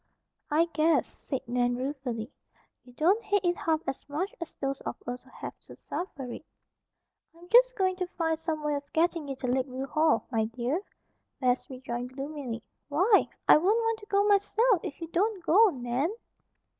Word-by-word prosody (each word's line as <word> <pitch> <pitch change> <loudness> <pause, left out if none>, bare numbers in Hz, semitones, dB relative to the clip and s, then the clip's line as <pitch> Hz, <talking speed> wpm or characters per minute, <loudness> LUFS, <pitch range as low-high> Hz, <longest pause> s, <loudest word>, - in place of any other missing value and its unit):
"I 315 +3 +4
guess," 320 +1 +3
said 270 -5 -6
Nan 245 0 +1
ruefully, 255 -3 -4 0.5
"you 250 - -16
don't 370 - +3
hate 405 -3 +1
it 350 0 +3
half 320 -2 0
as 270 - -4
much 335 +8 -2
as 335 - -6
those 275 0 -3
of - - -4
us 245 +1 -4
who 260 - -21
have - - -7
to - - -11
suffer 340 -6 -5
it." - - -8 0.9
"I'm 345 +1 -15
just - - +6
going 375 -2 +1
to 365 -1 -2
find 325 -3 -1
some 320 -2 -3
way 300 0 0
of 285 0 -5
getting 330 -2 +1
you 275 - -3
to 260 - -6
Lakeview 260 +1 -1
Hall, 305 -3 +2
my 225 -2 +2
dear," 245 - -2 0.6
Bess 250 -1 +1
rejoined 250 -1 -5
gloomily. 275 -5 -5 0.3
"Why! 375 +9 +4 0.2
I - - +9
won't 385 +8 +3
want 455 -1 0
to 415 - -13
go 400 0 +3
myself 415 +1 +3
if - - -6
you 330 - -4
don't 385 +2 0
go, 425 +7 +6
Nan." 255 0 -1
305 Hz, 180 wpm, -29 LUFS, 260-370 Hz, 0.9 s, I